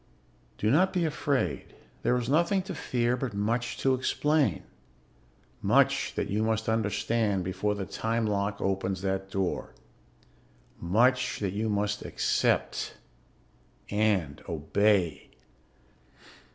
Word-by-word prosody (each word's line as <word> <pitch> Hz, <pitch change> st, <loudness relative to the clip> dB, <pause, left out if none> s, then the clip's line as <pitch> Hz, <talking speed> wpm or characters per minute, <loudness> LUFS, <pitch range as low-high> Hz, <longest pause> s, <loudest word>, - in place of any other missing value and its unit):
"Do 110 Hz, -, +1 dB
not 180 Hz, +7 st, +4 dB
be 180 Hz, -3 st, +1 dB
afraid. 145 Hz, -3 st, -1 dB, 0.3 s
There 125 Hz, -, +2 dB
is 120 Hz, -2 st, -2 dB
nothing 170 Hz, +7 st, +2 dB
to 190 Hz, 0 st, -6 dB
fear, 125 Hz, -6 st, 0 dB
but 125 Hz, -4 st, -4 dB
much 115 Hz, +4 st, -1 dB
to 135 Hz, -, +2 dB
explain. 135 Hz, -, +1 dB, 1.0 s
Much -, -, +2 dB
that -, -, -1 dB
you 105 Hz, +2 st, -1 dB
must 110 Hz, 0 st, 0 dB
understand 110 Hz, -2 st, 0 dB
before 95 Hz, +3 st, -1 dB
the 100 Hz, -2 st, -4 dB
time 115 Hz, +3 st, -1 dB
lock 100 Hz, -1 st, -1 dB
opens 95 Hz, -1 st, -1 dB
that 95 Hz, 0 st, -2 dB
door. 95 Hz, -2 st, -2 dB, 1.0 s
Much 125 Hz, +8 st, +2 dB
that 100 Hz, -3 st, -2 dB
you 110 Hz, +2 st, -1 dB
must 105 Hz, 0 st, -1 dB
accept -, -, 0 dB, 1.0 s
and 100 Hz, -9 st, +1 dB
obey. 90 Hz, +3 st, +1 dB
110 Hz, 115 wpm, -28 LUFS, 100-125 Hz, 1.0 s, not